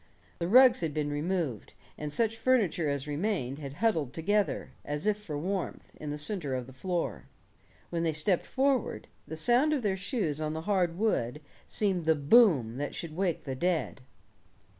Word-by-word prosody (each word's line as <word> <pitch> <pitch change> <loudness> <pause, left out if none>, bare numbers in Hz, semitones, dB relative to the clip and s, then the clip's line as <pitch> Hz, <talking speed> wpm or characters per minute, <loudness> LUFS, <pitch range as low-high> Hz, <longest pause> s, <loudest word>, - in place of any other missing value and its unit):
The 170 - -1
rugs 255 +3 +7
had 160 -3 -2
been 150 -1 -1
removed, 150 - -2 0.2
and 150 -1 -5
such 225 +5 +1
furniture 220 - +2
as 140 -1 -2
remained 150 - -2
had 140 -2 -6
huddled 160 - 0
together, 205 +5 0
as 150 +3 -4
if 210 -1 +3
for 155 -8 -5
warmth, 185 +5 -4
in 150 - -7
the 145 - -3
center 150 -3 -2
of 125 -1 -3
the 130 - -13
floor. 175 +5 -3 0.7
When 170 -1 -1
they 165 -1 +1
stepped 160 +4 0
forward, 270 -3 0 0.2
the 160 - -6
sound 245 - +3
of 275 -5 -1
their 200 -3 +1
shoes 190 - -2
on 155 0 -1
the 160 - -4
hard 180 -2 +1
wood 150 - 0 0.3
seemed 190 -5 0
the 160 0 +4
boom 145 - +4
that 145 +1 -3
should 160 -2 -5
wake 180 -2 -1
the 135 - -4
dead. 160 -2 -1
165 Hz, 180 wpm, -30 LUFS, 145-205 Hz, 0.7 s, rugs